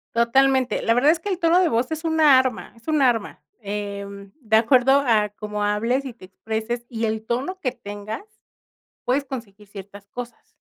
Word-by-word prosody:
Totalmente. 260 +2 +2
La 230 - +2
verdad 275 +6 +4
es 335 - -1
que 375 - -9
el 375 -3 -1
tono 340 0 +4
de 365 - +3
voz 245 +3 0
es 320 +1 -4
una 310 -4 +5
arma 260 -2 -2
es 230 - -22
un 310 -2 +2
arma, 235 - +1 0.2
em, 200 -1 -6
de 220 -5 +1
acuerdo 260 +4 +4
a 215 -3 +3
cómo 210 -1 -5
hables 230 +6 0
y 255 - -6
te 230 - -19
expreses 220 +5 -4
y 230 -2 -5
el 220 0 -2
tono 265 +12 -3
que 255 -7 -2
tengas 205 - -7 0.8
puedes 275 +3 +1
conseguir 220 -6 -8
ciertas 200 0 -11
cosas. 245 +3 -10
235 Hz, 185 wpm, -23 LUFS, 210-270 Hz, 0.8 s, una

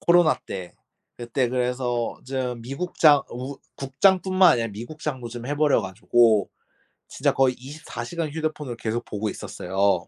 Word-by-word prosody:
코로나 175 -2 +5
때. 90 -2 -6 0.4
그때 120 +1 -1
그래서 125 -1 -1
좀 125 -3 -3
미국장 145 +2 +3
우 135 +2 -6 0.2
국장뿐만 185 +5 +4
아니라 115 -1 0
미국장도 125 +3 -6
좀 120 +1 -7
해 145 - -1
버려 150 -5 +4
가지고 105 +2 +2 0.6
진짜 - - 0
거의 130 -2 +3
24 130 -2 -8
시간 165 +4 -3
휴대폰을 155 -4 -3
계속 115 +1 -3
보고 105 +1 -3
있었어요. 95 -1 -1
125 Hz, 300 characters per minute, -24 LUFS, 115-150 Hz, 0.6 s, 코로나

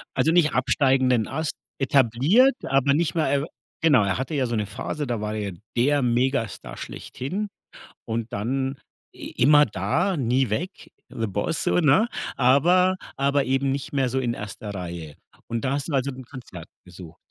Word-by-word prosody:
Also, 140 +5 +2
nicht 165 -3 +3
absteigenden 130 -2 +2
Ast, 160 -1 -3 0.3
etabliert, 140 - +4
aber 135 +1 +2
nicht 165 +2 0
mehr 155 -4 +1
äh, - - -3 0.4
genau, 145 -10 +5
er 100 +3 0
hatte 135 +5 -4
ja 135 -2 +1
so 120 -1 -2
'ne 105 -1 0
Phase, 140 +8 -5
da 115 -3 -2
war 105 0 -3
er 100 -3 -3 0.2
der 145 +3 +3
Megastar 125 -1 -1
schlechthin 190 +11 -5 0.6
und 115 0 -4
dann 130 +6 -2 0.4
i - - -8
immer 145 +3 +7
da, 135 - 0
nie 130 -2 +1
weg, 175 - -4 0.2
the 115 - -3
Boss 100 +10 -1
so, - - +1
ne? 175 - +4 0.3
Aber 175 +9 +4 0.2
aber 140 0 +2
eben 135 +1 0
nicht 135 +1 -4
mehr 135 -3 +1
so 130 +2 -1
in 120 -2 -1
1. 105 0 -7
Reihe. 85 -5 -6 0.3
Und 115 +2 -3
da 130 - 0
hast 145 +2 -2
du - - -4
also 135 +1 +1
'n 130 -1 -9
Konzert 120 - -10 0.2
besucht? 90 -2 -12
130 Hz, 175 wpm, -24 LUFS, 115-145 Hz, 0.6 s, immer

